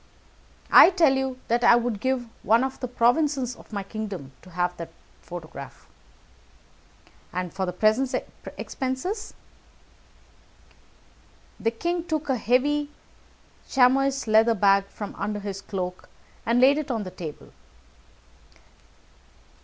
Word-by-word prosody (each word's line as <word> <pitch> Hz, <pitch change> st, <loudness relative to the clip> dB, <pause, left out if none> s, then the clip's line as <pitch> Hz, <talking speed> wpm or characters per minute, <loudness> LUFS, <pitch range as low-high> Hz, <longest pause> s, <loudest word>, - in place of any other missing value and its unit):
"I -, -, +10 dB
tell 335 Hz, -7 st, +4 dB
you 265 Hz, -1 st, -2 dB
that 240 Hz, +1 st, +1 dB
I 235 Hz, -, +7 dB
would 240 Hz, -3 st, -1 dB
give 260 Hz, +1 st, -1 dB, 0.2 s
one 230 Hz, +3 st, +3 dB
of 265 Hz, 0 st, -4 dB
the 255 Hz, -, -3 dB
provinces 250 Hz, +1 st, +1 dB
of -, -, -17 dB
my 200 Hz, -2 st, -3 dB
kingdom 195 Hz, -9 st, -6 dB
to 185 Hz, -, -15 dB
have 180 Hz, 0 st, -1 dB
that 170 Hz, -1 st, -7 dB, 0.3 s
photograph." 160 Hz, -6 st, -10 dB, 1.4 s
"And 180 Hz, -1 st, -4 dB
for 190 Hz, -2 st, -2 dB
present 220 Hz, +8 st, +2 dB, 0.4 s
expenses?" 360 Hz, -, -4 dB, 2.2 s
The 225 Hz, -, +1 dB
king 340 Hz, +9 st, -2 dB
took 315 Hz, -3 st, -3 dB
a 265 Hz, -, +3 dB
heavy 285 Hz, +6 st, +1 dB, 0.8 s
chamois 270 Hz, +1 st, +3 dB
leather 220 Hz, +1 st, +4 dB
bag 195 Hz, 0 st, +4 dB
from 205 Hz, 0 st, -7 dB
under 205 Hz, +1 st, -2 dB
his 200 Hz, -1 st, -6 dB
cloak, 180 Hz, -3 st, -5 dB, 0.4 s
and 235 Hz, +1 st, +3 dB
laid 275 Hz, +4 st, +5 dB
it 300 Hz, -, -5 dB
on 225 Hz, -4 st, -1 dB
the 185 Hz, -, -7 dB
table. 165 Hz, -5 st, -9 dB
235 Hz, 120 wpm, -25 LUFS, 195-265 Hz, 2.2 s, I